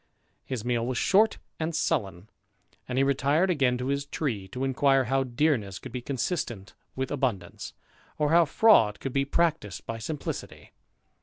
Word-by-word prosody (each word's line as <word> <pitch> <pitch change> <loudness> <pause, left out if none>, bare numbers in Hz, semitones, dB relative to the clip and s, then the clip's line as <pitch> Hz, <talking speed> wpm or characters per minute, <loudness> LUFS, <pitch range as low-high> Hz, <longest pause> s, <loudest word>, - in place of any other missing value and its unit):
His 120 -4 -5
meal 120 -1 0
was 130 -1 -2
short 205 +3 +3 0.2
and 160 0 -2
sullen; 100 - -1 0.6
and 125 - -2
he 135 - +4
retired 140 +6 +2
again 130 -6 +2
to 125 - -4
his 140 0 -1
tree, 115 -11 -3
to 125 +7 -5
inquire 135 0 +3
how 135 +2 +1
dearness 120 -7 0
could - - -9
be 125 - -4
consistent 120 - -3 0.2
with 130 0 -3
abundance, 130 -8 -3 0.4
or 150 0 +1
how 170 0 +6
fraud 140 - +4
could 135 - -5
be 135 0 +1
practised 155 - -1
by 115 0 -5
simplicity. 145 +6 -6
135 Hz, 160 wpm, -27 LUFS, 120-150 Hz, 0.6 s, how